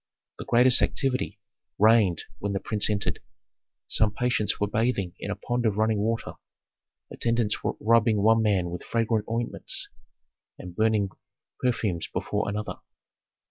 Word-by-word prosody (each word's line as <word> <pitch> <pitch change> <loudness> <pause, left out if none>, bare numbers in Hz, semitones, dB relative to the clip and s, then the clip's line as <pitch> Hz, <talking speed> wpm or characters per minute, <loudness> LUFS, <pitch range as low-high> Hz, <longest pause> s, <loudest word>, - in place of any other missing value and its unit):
The - - -6
greatest 125 +1 +5
activity 130 -1 -1 0.4
reigned 105 -5 +4 0.2
when 100 0 -2
the 100 - -1
prince 105 +1 0
entered. 105 -1 -1 0.7
Some 110 -1 +2
patients 120 -1 0
were 105 - +2
bathing 105 -4 -1
in - - -5
a - - -2
pond 120 0 -2
of 105 -2 -1
running 110 -1 +2
water; 115 +2 -1 0.8
attendants 115 -2 -1
were - - -1
rubbing 110 -2 +3
one 115 +1 +5
man 95 -5 +1
with 90 - -5
fragrant 115 -2 0
ointments, 115 +1 -3 0.7
and 90 -1 -9
burning 110 -2 +2 0.5
perfumes 110 -8 -1
before - - -2
another. 105 +1 -4
110 Hz, 140 wpm, -26 LUFS, 100-115 Hz, 0.8 s, greatest